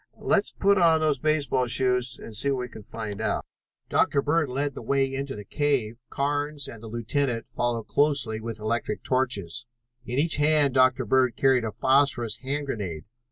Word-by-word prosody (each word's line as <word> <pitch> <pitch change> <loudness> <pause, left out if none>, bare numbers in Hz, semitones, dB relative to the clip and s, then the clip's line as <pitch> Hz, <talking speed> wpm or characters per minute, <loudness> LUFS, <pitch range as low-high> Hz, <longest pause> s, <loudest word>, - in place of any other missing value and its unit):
Let's 210 -1 +1
put 200 0 +2
on 165 -2 +5
those 155 -3 +1
baseball 145 -4 +1
shoes 125 -1 +2
and 110 - -10
see 135 +6 0
what 135 -2 0
we 125 - -5
can 110 - -11
find 105 0 -6
out." 110 - -1 0.4
Dr. 140 - +2
Bird 155 -1 +1
led 140 +2 -2
the - - -8
way 135 -1 0
into 135 0 -4
the 105 -1 -9
cave, 130 -6 -1
Carnes 145 +1 -2
and 115 - -10
the 115 - -9
lieutenant 120 +2 -2
following 120 -2 -2
closely 135 -5 +1
with 115 -1 -6
electric 110 0 -2
torches. 120 -5 0 0.4
In 125 - -5
each 155 +2 +3
hand 150 -2 +3
Dr. 130 -1 +3
Bird 130 +1 +2
carried 130 -3 +3
a 110 - -3
phosphorus 130 -2 +2
hand 140 +2 -3
grenade. 95 - -4
130 Hz, 180 wpm, -26 LUFS, 115-145 Hz, 0.4 s, on